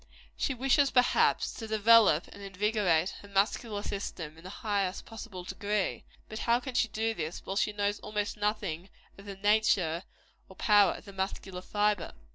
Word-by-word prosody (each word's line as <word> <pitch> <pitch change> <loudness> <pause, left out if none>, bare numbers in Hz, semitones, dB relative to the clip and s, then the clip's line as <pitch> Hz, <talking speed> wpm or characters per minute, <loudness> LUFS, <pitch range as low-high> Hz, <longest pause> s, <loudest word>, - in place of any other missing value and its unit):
She 270 - -1
wishes, 270 +3 +3
perhaps, 250 -1 +3
to 225 - -7
develope 215 -5 +5
and 200 - -12
invigorate 195 -3 +1
her 200 - -13
muscular 205 +1 0
system 170 -7 -5
in 165 - -16
the 185 - -8 0.2
highest 200 -3 -1
possible 220 -5 -8
degree; 200 +2 -2 0.2
but 220 - -7
how 235 0 +2
can 260 0 -7
she 240 -1 +2
do 225 +1 -1
this, 160 -4 -5
while 195 - -4
she 210 - +1
knows 205 0 -1
almost 210 0 -3
nothing 205 -4 -2 0.3
of 200 - -12
the 200 -1 -7
nature 195 -5 +2 0.5
or 190 - -13
power 205 -2 +4
of - - -11
the 200 - -11
muscular 190 -1 -4
fibre? 205 -1 0
205 Hz, 170 wpm, -30 LUFS, 190-220 Hz, 0.5 s, develope